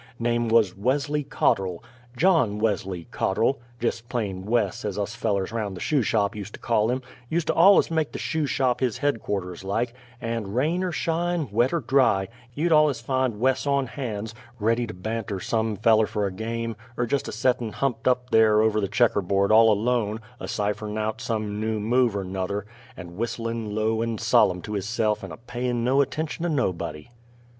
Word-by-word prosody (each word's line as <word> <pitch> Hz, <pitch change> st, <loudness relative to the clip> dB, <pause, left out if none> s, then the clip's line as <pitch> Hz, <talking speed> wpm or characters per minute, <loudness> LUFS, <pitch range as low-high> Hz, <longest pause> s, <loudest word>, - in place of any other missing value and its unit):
Name 120 Hz, 0 st, 0 dB
wuz 110 Hz, -5 st, +4 dB
Wesley 145 Hz, +7 st, 0 dB
Cotterl 95 Hz, -9 st, 0 dB, 0.3 s
John 150 Hz, -, +3 dB
Wesley 95 Hz, -5 st, -1 dB
Cotterl 115 Hz, +8 st, +1 dB, 0.2 s
jest 115 Hz, 0 st, -2 dB
plain 100 Hz, -6 st, -3 dB
Wes, 110 Hz, -5 st, 0 dB
as 105 Hz, -2 st, -3 dB
us 105 Hz, +2 st, -2 dB
fellers 105 Hz, -5 st, -1 dB
round 105 Hz, -5 st, -3 dB
the -, -, -7 dB
Shoe 145 Hz, +5 st, +1 dB
Shop 105 Hz, -2 st, +1 dB
ust 105 Hz, 0 st, -7 dB
to -, -, -14 dB
call 110 Hz, -2 st, +1 dB
him; 130 Hz, +1 st, -1 dB, 0.3 s
ust 165 Hz, 0 st, +1 dB
to -, -, +1 dB
allus 190 Hz, +1 st, +6 dB
make 160 Hz, -2 st, 0 dB
the -, -, -5 dB
Shoe 155 Hz, -2 st, -1 dB
Shop 125 Hz, -3 st, +1 dB
his 125 Hz, -3 st, 0 dB
headquarters 100 Hz, -10 st, -2 dB
like; 115 Hz, +5 st, -1 dB, 0.3 s
and, 115 Hz, -4 st, -3 dB
rain 160 Hz, +8 st, +1 dB
er 185 Hz, -, -1 dB
shine, 170 Hz, -2 st, -1 dB
wet 120 Hz, +5 st, +2 dB
er 170 Hz, -, 0 dB
dry, 120 Hz, -7 st, +2 dB, 0.3 s
you'd 165 Hz, +4 st, 0 dB
allus 150 Hz, -4 st, +4 dB
find 130 Hz, -2 st, -1 dB
Wes 130 Hz, +3 st, +1 dB
on 140 Hz, -1 st, +2 dB
hands, 115 Hz, -5 st, -5 dB, 0.3 s
ready 115 Hz, +3 st, +1 dB
to 110 Hz, -, -6 dB
banter 110 Hz, +1 st, -4 dB
some 110 Hz, +2 st, -1 dB
feller 110 Hz, +1 st, +4 dB
fer 105 Hz, -1 st, -1 dB
a 100 Hz, -, -2 dB
game, 115 Hz, +3 st, -3 dB, 0.2 s
er 120 Hz, -, +1 dB
jest 140 Hz, +4 st, -1 dB
a -, -, -4 dB
settin' 120 Hz, 0 st, 0 dB
humped 125 Hz, -4 st, -1 dB
up 125 Hz, 0 st, +1 dB
there 110 Hz, -1 st, +5 dB
over 110 Hz, -1 st, +2 dB
the 100 Hz, -, 0 dB
checker 105 Hz, +1 st, +2 dB
board 100 Hz, +2 st, +1 dB
all 110 Hz, 0 st, +7 dB
alone, 110 Hz, 0 st, 0 dB, 0.2 s
a -, -, -6 dB
cipher'n' 105 Hz, +1 st, -2 dB
out 110 Hz, +1 st, -2 dB
some 105 Hz, -2 st, -2 dB
new 110 Hz, 0 st, -1 dB
move 120 Hz, +1 st, +2 dB
er 100 Hz, -, -2 dB
'nuther, 95 Hz, +2 st, -3 dB, 0.3 s
and 85 Hz, -1 st, -9 dB
whistlin' 115 Hz, -2 st, -3 dB
low 110 Hz, +1 st, +1 dB
and 115 Hz, -1 st, -2 dB
solem' 110 Hz, -5 st, +3 dB
to 105 Hz, -, -7 dB
hisse'f 105 Hz, +1 st, 0 dB
like -, -, -16 dB
and -, -, -9 dB
a -, -, -9 dB
payin' 120 Hz, 0 st, -3 dB
no 130 Hz, +3 st, +3 dB
attention 155 Hz, +4 st, -3 dB
to 175 Hz, -, 0 dB
nobody. 90 Hz, -, -2 dB
115 Hz, 190 wpm, -25 LUFS, 105-125 Hz, 0.3 s, all